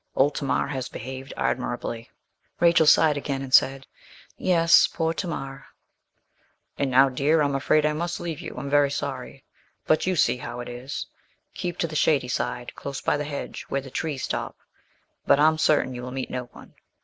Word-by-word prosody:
Old 140 Hz, +2 st, +3 dB
Tamar 140 Hz, -, 0 dB
has 130 Hz, -3 st, -4 dB
behaved 130 Hz, +2 st, -7 dB
admirably.' 115 Hz, 0 st, -2 dB, 0.5 s
Rachel 170 Hz, -2 st, +5 dB
sighed 150 Hz, -1 st, +5 dB
again 140 Hz, -1 st, -3 dB
and 130 Hz, -1 st, -8 dB
said 135 Hz, 0 st, +4 dB, 0.5 s
'Yes 165 Hz, -2 st, +5 dB
poor 165 Hz, -1 st, -1 dB
Tamar.' 135 Hz, -6 st, -5 dB, 1.1 s
'And 140 Hz, -, -1 dB
now, 130 Hz, +2 st, +6 dB
dear, 145 Hz, +5 st, +2 dB
I'm 140 Hz, -1 st, +1 dB
afraid 150 Hz, +2 st, +2 dB
I 150 Hz, -, +2 dB
must 170 Hz, +3 st, -3 dB
leave 165 Hz, -4 st, -5 dB
you -, -, -7 dB
I'm 130 Hz, +3 st, -5 dB
very 145 Hz, 0 st, +3 dB
sorry; 135 Hz, -1 st, -5 dB, 0.4 s
but 155 Hz, -, +2 dB
you 185 Hz, -, +1 dB
see 145 Hz, -, +3 dB
how 120 Hz, -1 st, -7 dB
it 120 Hz, -, -6 dB
is; 125 Hz, +3 st, -6 dB, 0.5 s
keep 175 Hz, -1 st, -4 dB
to 165 Hz, -, 0 dB
the 155 Hz, -, -8 dB
shady 145 Hz, -4 st, +2 dB
side, 125 Hz, 0 st, -3 dB
close 140 Hz, -1 st, -6 dB
by -, -, +1 dB
the 150 Hz, 0 st, -3 dB
hedge, 145 Hz, -1 st, -6 dB
where 140 Hz, -, 0 dB
the 135 Hz, -1 st, -11 dB
trees 145 Hz, -1 st, -3 dB
stop; -, -, -3 dB, 0.7 s
but 140 Hz, -, +5 dB
I'm 155 Hz, +1 st, +4 dB
certain 150 Hz, -4 st, +2 dB
you 125 Hz, -, -6 dB
will 125 Hz, -, -6 dB
meet 130 Hz, 0 st, -4 dB
no 125 Hz, -1 st, -3 dB
one. 120 Hz, -, -16 dB
140 Hz, 185 wpm, -25 LUFS, 130-155 Hz, 1.1 s, now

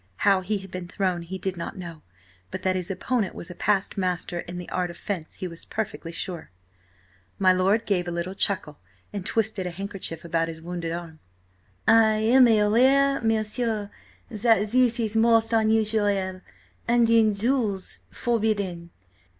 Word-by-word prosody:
How 195 Hz, -2 st, +5 dB
he 205 Hz, +3 st, -1 dB
had 190 Hz, -1 st, -9 dB
been 185 Hz, -1 st, -6 dB
thrown 185 Hz, -2 st, -1 dB
he 175 Hz, +3 st, -6 dB
did 190 Hz, 0 st, -3 dB
not 170 Hz, -, -6 dB
know, 170 Hz, -4 st, -8 dB, 0.5 s
but -, -, -6 dB
that 185 Hz, 0 st, +1 dB
his 180 Hz, -2 st, -3 dB
opponent 200 Hz, +2 st, -1 dB
was 170 Hz, -, -8 dB
a -, -, -6 dB
past 200 Hz, +2 st, 0 dB
master 180 Hz, -1 st, -2 dB
in 175 Hz, +1 st, -7 dB
the 180 Hz, -, -7 dB
art 180 Hz, -1 st, -1 dB
of 170 Hz, -, -9 dB
fence 180 Hz, -6 st, -5 dB
he 185 Hz, -, -5 dB
was 165 Hz, -1 st, -9 dB
perfectly 205 Hz, -6 st, -5 dB
sure. 170 Hz, 0 st, -5 dB, 0.9 s
My 185 Hz, -1 st, +5 dB
lord 195 Hz, +5 st, +2 dB
gave 180 Hz, -4 st, 0 dB
a -, -, -2 dB
little 170 Hz, +2 st, -3 dB
chuckle 190 Hz, -6 st, 0 dB, 0.3 s
and 200 Hz, -2 st, -4 dB
twisted 210 Hz, -2 st, -1 dB
a -, -, -2 dB
handkerchief 180 Hz, -2 st, -6 dB
about 165 Hz, 0 st, 0 dB
his 160 Hz, -1 st, -7 dB
wounded 170 Hz, 0 st, -5 dB
arm. 165 Hz, -2 st, -6 dB, 0.7 s
"I 220 Hz, -1 st, +6 dB
am 240 Hz, +4 st, +5 dB
aware, 255 Hz, +6 st, +4 dB
m'sieur, 220 Hz, -1 st, -1 dB, 0.4 s
that 215 Hz, -1 st, +2 dB
this 245 Hz, -1 st, +3 dB
is 220 Hz, -1 st, -1 dB
most 225 Hz, 0 st, +3 dB
unusual–and, 210 Hz, -4 st, +1 dB, 0.7 s
in 225 Hz, -2 st, +4 dB
duels–forbidden. 210 Hz, -4 st, -1 dB
195 Hz, 160 wpm, -25 LUFS, 180-220 Hz, 0.9 s, I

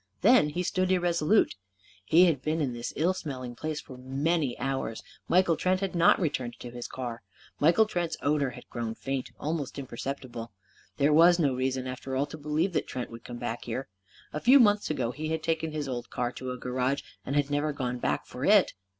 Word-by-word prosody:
Then 220 Hz, -6 st, +6 dB
he 175 Hz, +4 st, -2 dB
stood 185 Hz, +1 st, 0 dB
irresolute. 175 Hz, +1 st, +3 dB, 0.5 s
He 175 Hz, -, +6 dB
had 155 Hz, -7 st, +2 dB
been 155 Hz, +3 st, -1 dB
in 135 Hz, -5 st, 0 dB
this 120 Hz, 0 st, -4 dB
ill 170 Hz, +5 st, +2 dB
smelling 130 Hz, -9 st, -6 dB
place 155 Hz, +3 st, -3 dB
for 130 Hz, -3 st, -11 dB
many 140 Hz, +2 st, 0 dB
hours. 135 Hz, -3 st, -3 dB, 0.2 s
Michael 175 Hz, -2 st, +4 dB
Trent 185 Hz, +2 st, +1 dB
had 195 Hz, -1 st, -2 dB
not 170 Hz, -1 st, +5 dB
returned 130 Hz, -8 st, -2 dB
to 120 Hz, -, -8 dB
his 120 Hz, 0 st, -6 dB
car. 120 Hz, -3 st, -5 dB, 0.4 s
Michael 170 Hz, +9 st, +5 dB
Trent's 175 Hz, -5 st, -2 dB
odour 145 Hz, -1 st, +1 dB
had 125 Hz, -, -11 dB
grown 115 Hz, -1 st, -4 dB
faint 135 Hz, 0 st, -3 dB
almost 150 Hz, -3 st, -3 dB
imperceptible. 130 Hz, -4 st, -6 dB, 0.4 s
There 145 Hz, +1 st, +3 dB
was 170 Hz, +3 st, +7 dB
no 145 Hz, -6 st, +2 dB
reason, 130 Hz, 0 st, -1 dB
after 130 Hz, +1 st, -5 dB
all, 135 Hz, +2 st, +1 dB
to 145 Hz, -, -9 dB
believe 155 Hz, +5 st, 0 dB
that -, -, 0 dB
Trent 125 Hz, -2 st, -5 dB
would 115 Hz, 0 st, -10 dB
come 120 Hz, -, -7 dB
back 120 Hz, -1 st, -4 dB
here. 130 Hz, +3 st, -4 dB, 0.4 s
A 150 Hz, -, -2 dB
few 265 Hz, +3 st, +7 dB
months 210 Hz, -3 st, +4 dB
ago 120 Hz, -6 st, -1 dB
he 155 Hz, +4 st, -5 dB
had 160 Hz, 0 st, -2 dB
taken 160 Hz, -1 st, -1 dB
his 150 Hz, -2 st, -3 dB
old 125 Hz, -2 st, -4 dB
car 120 Hz, -1 st, -2 dB
to 130 Hz, 0 st, -6 dB
a 125 Hz, -, -4 dB
garage 125 Hz, +3 st, -1 dB, 0.2 s
and 135 Hz, -, -3 dB
had 145 Hz, 0 st, +1 dB
never 145 Hz, +1 st, +1 dB
gone 125 Hz, -3 st, -3 dB
back -, -, -1 dB
for -, -, -8 dB
it. -, -, +5 dB
145 Hz, 205 wpm, -28 LUFS, 125-165 Hz, 0.5 s, was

